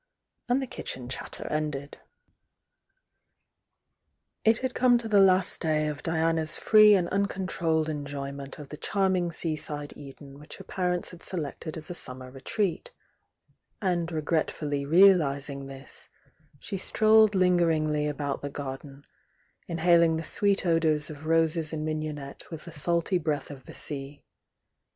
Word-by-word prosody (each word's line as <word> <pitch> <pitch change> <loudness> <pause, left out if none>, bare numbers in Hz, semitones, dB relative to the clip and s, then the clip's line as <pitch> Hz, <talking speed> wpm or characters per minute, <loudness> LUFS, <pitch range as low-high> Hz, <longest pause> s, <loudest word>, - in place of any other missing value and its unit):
"— - - -42
and 260 +2 +2
the - - -2
kitchen 130 - -4
chatter 135 - -4
ended. 150 -2 -3 2.4
It 225 0 +4
had 260 0 -3
come 245 -1 +4
to 235 -1 -3
the 210 -2 +4
last 190 -1 +3
day 155 -2 +1
of 150 -1 -4
Diana's 160 -1 +1
free 215 -1 +7
and 180 -3 +1
uncontrolled 185 -5 0
enjoyment 140 -2 -5
of 145 -2 -10
the 150 - -7
charming 185 -3 0
sea 160 -1 -2
side 145 -1 -5
Eden 140 0 -12
which 150 - -9
her - - -10
parents 180 -2 -2
had 175 -1 -13
selected 160 -1 -4
as 160 +3 -7
a - - -3
summer 130 -5 -5
retreat,— 200 - -2 0.9
and 175 -4 -1
regretfully 150 -2 -1
realising 145 -6 +4
this, 135 0 -10 0.5
she 195 +6 -5
strolled 215 +1 +4
lingeringly 165 -5 +2
about 145 -1 -3
the 145 - -4
garden, 140 0 -7 0.7
mhaling 170 -1 +4
the 160 - -4
sweet 200 +3 +2
odours 160 -3 +1
of 155 +1 -9
roses 165 -1 +1
and 155 -1 -3
mignonette 155 -3 -5
with 160 -2 -8
the 170 - -9
salty 170 +4 +1
breath 150 -3 -2
of 135 -3 -11
the - - -11
sea. 140 0 -7
160 Hz, 140 wpm, -27 LUFS, 145-180 Hz, 2.4 s, free